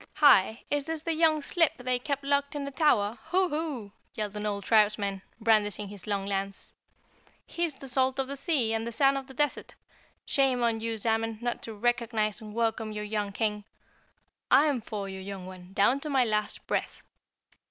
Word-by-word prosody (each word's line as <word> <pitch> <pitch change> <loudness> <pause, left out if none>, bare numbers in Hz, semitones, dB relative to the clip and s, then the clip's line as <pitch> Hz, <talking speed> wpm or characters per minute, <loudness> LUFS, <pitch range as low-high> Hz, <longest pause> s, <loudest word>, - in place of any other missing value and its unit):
"Hi, 225 -7 +5
is 290 0 0
this 320 -1 -4
the 330 - -1
young 315 -2 +3
slip 330 -1 +2
they 250 0 0
kept 280 +2 -3
locked 280 +1 0
in 285 -1 -3
the 280 - -5
tower? 240 -8 +2
Hoo, 370 0 +2
Hoo!" 295 -9 -3 0.2
yelled 210 -1 -3
an 210 0 -3
old 200 -1 -3
tribesman, 205 -2 +2 0.2
brandishing 210 -3 +2
his 200 -2 -10
long 200 -2 -1
lance. 195 0 -4 0.7
"He's 340 -4 -2
the 270 - -10
salt 260 +1 +1
of 270 -1 -1
the 280 - -4
sea 270 -7 +1
and 225 +1 -1
the - - -3
sand 275 +3 +3
of 270 -1 -4
the 265 - -12
desert. 295 +2 -1 0.5
Shame 265 -3 +2
on 230 -1 +1
you, 225 0 -3
Zamen, 225 0 0
not 240 0 -3
to 225 - -7
recognize 230 -2 0
and 215 -1 -9
welcome 225 -1 0
your 210 0 -4
young 210 -1 -2
King. 210 0 -1 0.9
I'm 285 -4 +4
for 205 -2 -5
you, 190 0 -6
young 190 -1 -7
one, 185 -1 -11
down 235 +8 +3
to 300 - -5
my 265 -3 +3
last 210 -2 -2
breath!" - - -3
230 Hz, 190 wpm, -28 LUFS, 210-275 Hz, 0.9 s, Hi